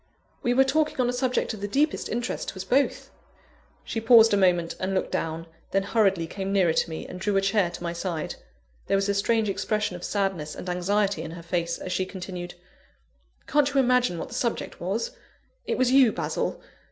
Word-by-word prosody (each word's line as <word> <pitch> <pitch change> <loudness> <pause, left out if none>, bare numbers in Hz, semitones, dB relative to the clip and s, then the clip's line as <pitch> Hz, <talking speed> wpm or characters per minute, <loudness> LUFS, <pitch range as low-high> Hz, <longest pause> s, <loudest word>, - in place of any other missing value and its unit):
We 245 0 +1
were 265 - +6
talking 300 +2 0
on 245 -1 +2
a - - -1
subject 250 -1 0
of 210 - -8
the 205 - -2
deepest 290 +8 0
interest 235 +1 -3
to - - -8
us 190 - -5
both." 270 +8 0 0.7
She 225 - -3
paused 225 -1 +7
a - - +6
moment, 180 -4 +2
and 190 +1 -1
looked 185 - -1
down; 165 +1 -2 0.2
then 195 0 +1
hurriedly 195 -5 +2
came 195 +3 -4
nearer 185 -5 +3
to 170 - +1
me, 160 - -5
and 180 - -8
drew 200 +1 0
a - - +3
chair 195 -2 +2
to 175 - -8
my 170 0 -2
side. 170 -2 -3 0.5
There 195 - +3
was 195 +1 0
a - - +3
strange 220 +2 +1
expression 205 0 -1
of 180 - -9
sadness 195 -7 -2
and - - -8
anxiety 195 +1 0
in 160 - -6
her 170 +1 -9
face, 170 0 -1
as 185 - -6
she 185 0 0
continued: 180 -2 -7 0.9
"Can't 290 -1 +2
you 275 - +2
imagine 250 -7 +3
what - - -5
the - - -10
subject 245 -2 -2
was? 200 +6 -2 0.6
It - - 0
was 255 -1 +2
you, 260 -4 +6
Basil. - - -2
195 Hz, 210 wpm, -26 LUFS, 180-235 Hz, 0.9 s, paused